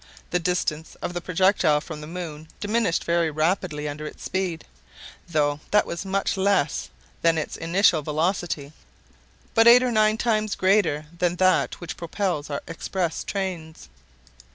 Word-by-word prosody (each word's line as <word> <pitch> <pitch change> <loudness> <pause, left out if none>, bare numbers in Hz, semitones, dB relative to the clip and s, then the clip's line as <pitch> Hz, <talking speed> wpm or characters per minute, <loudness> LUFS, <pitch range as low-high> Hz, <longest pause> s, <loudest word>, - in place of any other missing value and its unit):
The 180 - +2
distance 165 -3 -2
of 175 - -3
the 175 - -3
projectile 180 -4 +3
from 155 0 -8
the 150 - -8
moon 160 -3 -7
diminished 210 -4 0
very 170 -1 +1
rapidly 155 -1 -1
under 150 +1 -5
its - - -10
speed, 185 -4 -2 0.6
though 145 -3 +1
that 210 - +4
was 170 +3 -5
much 195 +1 -1
less 190 -6 +1 0.3
than 165 -1 +3
its 155 - -3
initial 170 -1 +3
velocity—but 160 +7 -2
eight 245 +2 +9
or 250 - +1
nine 215 -1 +3
times 215 -3 0
greater 185 -6 +2
than 175 0 0
that 185 +1 +2
which 175 - -7
propels 170 -3 -2
our 140 - -4
express 170 0 -3
trains. 175 - -5
175 Hz, 145 wpm, -24 LUFS, 155-195 Hz, 0.6 s, eight